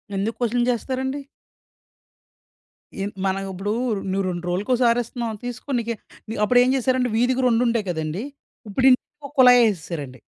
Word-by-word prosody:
ఎందుకు 205 +4 -1
క్వెషన్ 240 0 +1
జేస్తారండి? 265 +3 -2 1.8
ఎ - - -1 0.2
మనం 195 0 0
ఇప్పుడు 195 +3 -3 0.4
నువ్వు 195 0 0
రెండ్రోజులకోసారి 205 +8 +1
ఇస్తున్నావు. 235 -2 -4
తీసుకో 245 +3 -7
నీకె 230 0 -3 0.5
అప్పుడు 245 +3 +4
ఏం 255 - +2
జేశారంటే 255 -2 +1
వీధికి 255 +2 +2
రెండుండేయి 230 -3 +1
కదండీ! 160 +3 -3 0.5
ఇప్పుడు 255 +6 0
ఇంటికో 280 +3 -2
కుళాయి 250 -1 +8
ఏసేసారండి. 150 -8 -7
235 Hz, 120 wpm, -23 LUFS, 195-250 Hz, 1.8 s, కుళాయి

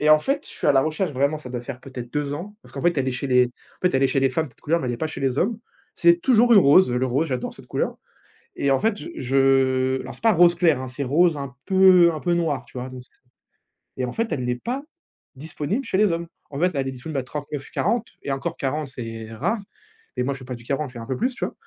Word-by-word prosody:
et 150 0 +4
en 155 - +8
fait, 275 - -1
je - - -7
suis - - -3
à - - +6
la 135 - +5
recherche 155 +2 -1
vraiment, 140 +4 +1
ça 130 - -10
doit 120 -1 -3
faire 125 +1 -7
peut-être 125 -3 -8
2 145 -1 -1
ans, 205 +7 -7
parce - - -17
qu'en 135 - -5
fait, 175 -4 +2
elle 135 - 0
est 130 - 0
chez 140 +2 -4
les 125 -1 +5
en 125 - -20
fait 180 - +1
elle 135 - +3
est 135 - +4
chez 135 - 0
les 135 0 +3
femmes, 160 +5 -1
cette - - -26
couleur, 165 +3 +1
mais 125 - -3
elle - - -1
est - - -6
pas 160 - -2
chez 155 - -7
les 135 0 0
hommes. 220 +4 +1 0.4
C'est 170 0 +4
toujours 240 +1 +4
le 210 - +9
rose. 185 0 +6
Le 125 +1 +1
rose, 140 +6 0
j'adore 125 -2 -3
cette - - -15
couleur - - -2 0.6
et 140 - +1
en 135 - +3
fait, 220 -1 +1
je 335 - -8
je 130 0 +2
alors 130 +1 -8
c'est - - -12
pas 225 -2 +5
rose 175 0 +5
clair 165 -7 +3
hein, 130 - -5
c'est 140 +3 -5
rose 160 +4 +3
un 140 -3 -6
peu, 190 -2 +6
heu, 170 - +3
un 155 - -5
peu 175 +1 0
noir, 150 -7 0
tu 125 - -12
vois? 130 +1 -5
Donc 125 -1 -9
c'est - - -24 0.9
et 125 - +1
en 125 - -4
fait, 230 -1 -2
elle 125 - -1
l'est 125 0 0
pas 255 +3 -2 0.5
disponible 160 - -3
chez 190 - -1
les 210 -3 +4
hommes. 170 0 -2 0.2
En 140 - -7
fait, 180 +2 +3
elle 135 -2 -1
est 135 - -2
disponible 135 +3 -4
à - - -4
39-40 150 - -3 0.2
et 140 - -3
encore 155 +5 -3
40, 145 +2 -2
c'est 115 -4 -7
rare 220 - -1 0.6
et 125 - +1
moi, 140 +2 -1
je 135 - -9
fais 130 - -11
pas 125 0 -5
du 120 - -13
40, 140 +2 -2
je - - -17
fais 120 - -8
un 115 - -7
peu 130 - -2
plus, 250 +1 -1
tu - - -2
vois? - - -6
140 Hz, 295 wpm, -23 LUFS, 130-170 Hz, 0.9 s, le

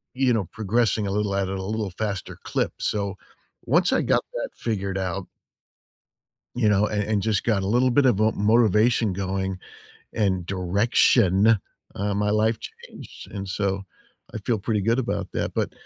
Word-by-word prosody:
you 130 -1 +3
know, 110 -4 +1
progressing 110 0 0
a 95 - -2
little 105 0 -1
at 100 -1 0
a 95 0 -3
little 105 0 -2
faster 100 0 -4
clip, - - -1
so, 100 -2 -1 0.5
once - - +2
I - - +3
got - - +2
that - - -3
figured 100 -4 -2
out 95 0 -3 1.3
you 120 -3 +2
know, 105 0 +3
a - - -5
and 105 0 0
just 110 0 0
got 105 -5 +1
a - - -2
little 120 +5 +3
bit 140 +3 +3
of 125 -6 +4
vo 110 +2 +3
motivation 110 0 +3
going 95 0 -2 0.6
and 95 -5 0
direction, 100 +2 +3 0.4
uh 100 +1 -2
my 105 +1 0
life 110 +1 +2
changed, - - -11
and 100 -1 -5
so, 100 0 -1 0.5
I - - -3
feel 110 +2 -1
pretty 105 +1 -1
good 115 +5 +1
about 120 - -2
that, - - -2
but - - -1
105 Hz, 170 wpm, -24 LUFS, 95-110 Hz, 1.3 s, of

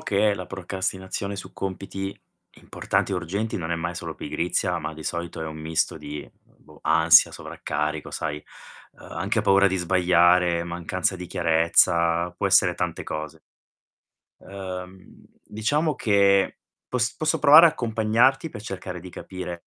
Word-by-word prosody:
che 105 +1 +2
la 90 -2 -5
procrastinazione 95 +1 -4
su - - -9
compiti 95 0 -5 0.3
importanti 100 - -2
e - - +1
urgenti 100 +6 -3
non 85 -1 -5
è - - +1
mai 85 +1 -4
solo 85 -2 -6
pigrizia, 90 +1 -2
ma 80 0 -5
di 80 - -10
solito 85 -1 -4
è - - -3
un 80 0 -7
misto 80 0 -1
di, 75 0 -7 0.2
boh, - - -21
ansia, 80 +1 +5
sovraccarico, 75 +1 -4
sai, 75 -2 -4 0.5
uhm, - - -19
anche - - -1
paura 100 0 +4
di 95 -1 0
sbagliare, 90 -1 +3
mancanza 85 +2 -2
di 90 -1 -7
chiarezza, 85 0 +2
può 90 - -3
essere - - +4
tante - - -3
cose. 75 -1 -6 1.0
Uhm, 95 -1 -9 0.2
diciamo 145 +9 -1
che 100 -4 +2 0.3
pos 120 -2 -1
posso 155 -1 0
provare 155 +3 +9
a - - +6
accompagnarti 120 +5 +1
pe 105 - -9
cercare 95 -3 -7
di 90 +1 -10
capire 90 -2 -8
90 Hz, 145 wpm, -24 LUFS, 85-100 Hz, 1.0 s, provare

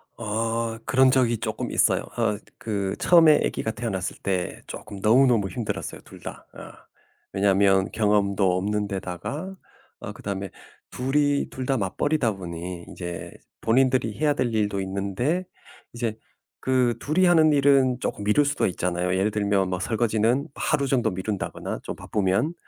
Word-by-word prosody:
어. 115 +1 -2
그런 130 0 +4
적이 125 -3 +2
쪼끔 - - -4
있어요. - - +2
어 105 - +1 0.2
그 100 -3 -2
처음에 165 -4 +6
애기가 110 - -1
태어났을 110 -6 -4
때 95 -2 -2
쪼끔 100 -2 -8
너무너무 115 -1 +4
힘들었어요, 115 -1 -4
둘 - - -14
다. - - -8
어. - - -11 0.7
왜냐면 95 -1 +3
경험도 100 -3 +2
없는 105 +2 -1
데다가 100 - -5 0.4
어 - - -6
그다음에 100 -1 -5 0.4
둘이 145 +2 +1
둘 130 - -5
다 135 +1 +1
맞벌이다 115 +5 0
보니 85 -1 -7
이제 85 -1 -6 0.3
본인들이 125 -1 +2
해야 150 -1 +3
될 125 -5 -1
일도 105 -2 0
있는데 100 - -1 0.5
이제 115 -2 -3 0.4
그 125 -2 +2
둘이 165 +6 +2
하는 160 -3 +5
일은 135 -3 +4
쪼끔 105 - -3
미룰 105 +8 +3
수도 145 0 0
있잖아요. 90 0 -1
예를 100 +3 +1
들면 100 -2 +1
뭐 90 -1 -2
설거지는 115 - +1
하루 140 -2 0
정도 120 -5 +1
미룬다거나 95 +2 -4
좀 - - -5
바쁘면 105 - 0
110 Hz, 310 characters per minute, -25 LUFS, 95-130 Hz, 0.7 s, 처음에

